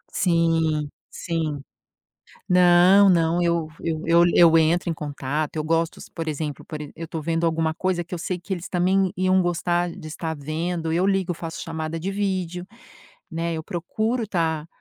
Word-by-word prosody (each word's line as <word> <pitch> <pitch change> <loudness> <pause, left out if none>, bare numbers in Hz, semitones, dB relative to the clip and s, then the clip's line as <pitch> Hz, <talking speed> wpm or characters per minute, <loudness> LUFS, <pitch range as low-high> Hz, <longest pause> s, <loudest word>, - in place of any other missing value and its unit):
Sim, 165 -5 +1 0.2
sim. 160 -4 -3 0.9
Não, 180 +2 +6
não, 170 0 +2
eu 170 -2 +1
eu 160 -2 -2
eu 170 +1 +5
l 175 - +2
eu 165 -2 +7
entro 165 +2 +2
em 165 - 0
contato, 145 0 -3
eu 155 - -1
gosto, 165 +1 0 0.2
por 165 -1 -4
exemplo 150 -2 -4
por 155 - -7
e 150 - -8
eu 165 0 -7
tô 160 - -4
vendo 165 +2 -1
alguma 160 -1 +1
coisa 180 -1 -1
que 180 - -7
eu - - -4
sei 180 +2 -3
que 190 +2 -4
eles 175 0 -7
também 185 +1 +1
iam 185 0 +3
gostar 175 0 0
de 155 - -10
estar 160 +1 -4
vendo, 160 +3 -3
eu 175 +3 +1
ligo, 195 -2 +1
faço 165 0 -7
chamada 160 0 -4
de 190 +4 -3
vídeo, 185 -3 -2 0.7
né, 165 0 -2
eu 160 - -4
procuro 220 +8 -2
tá 160 -5 -1
170 Hz, 180 wpm, -23 LUFS, 160-180 Hz, 0.9 s, eu